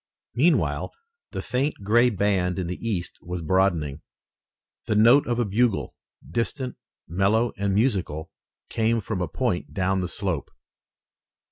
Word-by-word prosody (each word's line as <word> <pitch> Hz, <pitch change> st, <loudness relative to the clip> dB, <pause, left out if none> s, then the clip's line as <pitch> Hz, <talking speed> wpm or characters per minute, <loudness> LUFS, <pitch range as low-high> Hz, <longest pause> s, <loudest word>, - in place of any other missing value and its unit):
Meanwhile, 155 Hz, +9 st, +2 dB, 0.4 s
the -, -, -5 dB
faint 135 Hz, +4 st, 0 dB
gray 120 Hz, +5 st, +4 dB
band 95 Hz, -4 st, +1 dB
in 95 Hz, -, -1 dB
the 90 Hz, +5 st, -5 dB
east 90 Hz, -6 st, -3 dB
was 90 Hz, -1 st, -5 dB
broadening. 80 Hz, -5 st, +1 dB, 0.9 s
The 105 Hz, -, +1 dB
note 120 Hz, +7 st, +6 dB
of 120 Hz, -1 st, 0 dB
a 120 Hz, -, +1 dB
bugle, 110 Hz, +1 st, +1 dB, 0.3 s
distant, 120 Hz, -, -2 dB, 0.3 s
mellow, 100 Hz, +7 st, +2 dB
and 100 Hz, 0 st, 0 dB
musical, 95 Hz, -, 0 dB, 0.4 s
came 115 Hz, +1 st, +1 dB
from 105 Hz, -3 st, -3 dB
a 90 Hz, -, 0 dB
point 115 Hz, -, -2 dB
down 95 Hz, 0 st, +1 dB
the 90 Hz, -, -2 dB
slope. 95 Hz, -6 st, -3 dB
100 Hz, 135 wpm, -25 LUFS, 90-115 Hz, 0.9 s, note